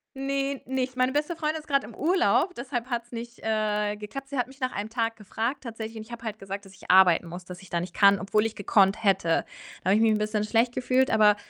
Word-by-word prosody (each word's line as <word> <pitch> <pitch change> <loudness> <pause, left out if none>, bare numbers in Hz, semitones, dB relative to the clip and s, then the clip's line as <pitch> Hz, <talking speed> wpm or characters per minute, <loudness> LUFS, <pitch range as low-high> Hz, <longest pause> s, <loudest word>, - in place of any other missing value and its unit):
Ne, 275 0 -2
nicht. 260 -1 -2
Meine 255 0 +2
beste 300 +4 -1
Freundin 310 -1 -1
ist 305 - -16
grad 275 -1 +2
im 230 - -10
Urlaub, 360 +2 +2
deshalb 250 -2 -4
hat's 235 0 -3
nicht, 235 0 -7
äh, 210 -1 0
geklappt. 270 +6 -7
Sie 280 - -4
hat 245 - +1
mich 270 +2 -16
nach 255 -1 -1
einem 205 +2 -4
Tag 230 -1 -1
gefragt 225 +6 -3
tatsächlich, 225 -2 -6
und 215 - -6
ich 225 - -16
habe 235 0 -8
halt 215 -1 -4
gesagt, 195 +1 -6
dass 190 - -15
ich - - -2
arbeiten 180 -2 +6
muss, 175 +2 -8
dass 180 0 -9
ich 190 - -16
da 170 - +1
nicht 175 0 -6
kann, 200 -1 +6
obwohl 210 +2 +1
ich 225 - -3
gekonnt 200 +1 +3
hätte. 190 -4 +2 0.4
Da 185 - 0
habe 200 - +5
ich 220 - +3
mich 225 - +5
'n 215 - 0
bisschen 210 0 0
schlecht 230 +2 +2
gefühlt, 255 +1 +2
aber 210 -2 +5
225 Hz, 255 wpm, -27 LUFS, 205-260 Hz, 0.4 s, arbeiten